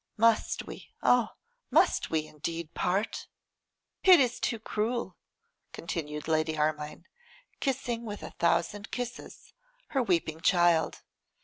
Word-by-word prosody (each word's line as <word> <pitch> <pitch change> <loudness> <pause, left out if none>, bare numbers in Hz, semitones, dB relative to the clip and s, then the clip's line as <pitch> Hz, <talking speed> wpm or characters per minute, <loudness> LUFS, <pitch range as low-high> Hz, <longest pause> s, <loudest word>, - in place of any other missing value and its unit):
must 230 0 +3
we, - - -10
oh! 245 -2 +4 0.4
must - - +3
we 155 -1 0
indeed 160 +2 -5
part?' 195 +5 -1 0.8
'It 370 -3 +9
is 250 -2 +1
too 230 - -1
cruel,' 225 +2 -2 0.6
continued 150 -3 -5
Lady 155 0 +1
Armine, 150 +2 -2 0.5
kissing 245 -4 -1
with 210 -3 -6
a - - -7
thousand 200 +5 0
kisses 245 0 -6 0.4
her 270 - +1
weeping 170 -7 0
child. 175 -2 +3
185 Hz, 115 wpm, -29 LUFS, 160-235 Hz, 0.8 s, It